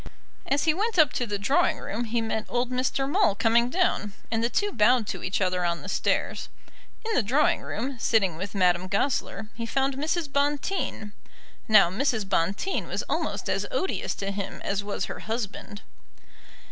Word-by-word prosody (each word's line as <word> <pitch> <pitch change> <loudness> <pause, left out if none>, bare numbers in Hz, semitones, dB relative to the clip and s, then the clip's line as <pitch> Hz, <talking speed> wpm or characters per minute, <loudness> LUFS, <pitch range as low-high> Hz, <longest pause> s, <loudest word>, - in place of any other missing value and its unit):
As 280 +2 +1
he 315 - +3
went 420 +4 -1
up 305 -6 +5
to 245 - -1
the 205 -1 -2
drawing 285 - +2
room 235 -2 -4
he 230 +1 -1
met 220 -1 -2
old 245 +1 -1
Mr. 260 +2 0
Maule 290 - +3
coming 230 +2 +3
down, 250 - 0 0.2
and 225 0 0
the 235 - +2
two 410 +10 0
bowed 240 - +4
to - - -4
each 185 - -1
other 185 -2 0
on 170 -1 -1
the - - -8
stairs. - - -1 0.6
In 450 - -1
the - - +3
drawing 265 +8 +2
room, 255 +3 -4
sitting 200 -8 +2
with 190 +5 -6
Madame 180 -1 +2
Goesler, 215 +1 -1
he 230 -1 -5
found 270 +2 0
Mrs. 315 +3 -1
Bonteen. 285 - -1 0.6
Now 215 -5 +6
Mrs. 220 -1 0
Bonteen 195 - 0
was - - -2
almost - - -2
as - - 0
odious 380 -7 -2
to 195 0 -3
him 200 -1 -5
as 200 0 -1
was 205 0 -2
her - - -7
husband. 215 -2 -5
230 Hz, 180 wpm, -26 LUFS, 200-280 Hz, 0.6 s, Now